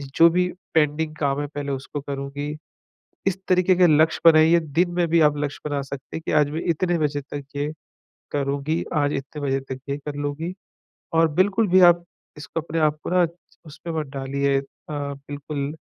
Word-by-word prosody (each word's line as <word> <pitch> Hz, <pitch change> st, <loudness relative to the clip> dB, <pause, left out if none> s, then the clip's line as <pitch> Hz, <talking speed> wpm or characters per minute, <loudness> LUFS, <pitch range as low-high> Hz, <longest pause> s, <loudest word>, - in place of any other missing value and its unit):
जो 165 Hz, +1 st, +7 dB
भी 180 Hz, +2 st, +2 dB, 0.3 s
पेंडिंग 155 Hz, 0 st, +1 dB
काम 140 Hz, -2 st, 0 dB
हैं 145 Hz, -, -3 dB
पहले 145 Hz, -1 st, -3 dB
उसको 135 Hz, +2 st, -5 dB
करूँगी। 140 Hz, +1 st, -5 dB, 0.7 s
इस 195 Hz, -1 st, +1 dB
तरीक़े 185 Hz, 0 st, +4 dB
के 180 Hz, -1 st, +5 dB
लक्ष्य 160 Hz, +1 st, +3 dB
बनाइए, 165 Hz, +1 st, +7 dB
दिन 165 Hz, +3 st, 0 dB
में 175 Hz, -1 st, +1 dB
भी 170 Hz, 0 st, +4 dB
आप 150 Hz, -1 st, +4 dB
लक्ष्य 145 Hz, -1 st, -3 dB
बना 145 Hz, -1 st, -1 dB
सकते 135 Hz, +1 st, -7 dB
हैं 160 Hz, -, -7 dB
कि -, -, -1 dB
आज 145 Hz, -1 st, +3 dB
मैं 160 Hz, +2 st, -3 dB
इतने 175 Hz, +1 st, +1 dB
बजे 145 Hz, -1 st, 0 dB
तक 145 Hz, +1 st, -7 dB
ये 145 Hz, +2 st, -1 dB, 0.6 s
करूँगी। 140 Hz, +3 st, -1 dB
आज 145 Hz, 0 st, +2 dB
इतने 135 Hz, +2 st, -5 dB
बजे 135 Hz, -1 st, 0 dB
तक 130 Hz, -1 st, -7 dB
ये 140 Hz, -, -1 dB
कर 145 Hz, 0 st, -7 dB
लूँगी। 145 Hz, +4 st, -3 dB, 0.6 s
और 165 Hz, 0 st, +5 dB
बिल्कुल 205 Hz, +3 st, +3 dB
भी 185 Hz, -, +6 dB
आप 175 Hz, 0 st, +2 dB, 0.3 s
इसको 160 Hz, +2 st, -4 dB
अपने 165 Hz, +1 st, -3 dB
आप 155 Hz, -1 st, +2 dB
को -, -, -4 dB
ना 180 Hz, -1 st, +4 dB
च -, -, -7 dB, 0.4 s
उसमें 160 Hz, +2 st, -8 dB
मत 150 Hz, -, -4 dB
डालिए 140 Hz, +1 st, 0 dB
अ, -, -, -7 dB, 0.3 s
बिल्कुल 145 Hz, 0 st, -4 dB
150 Hz, 195 wpm, -23 LUFS, 140-165 Hz, 0.7 s, जो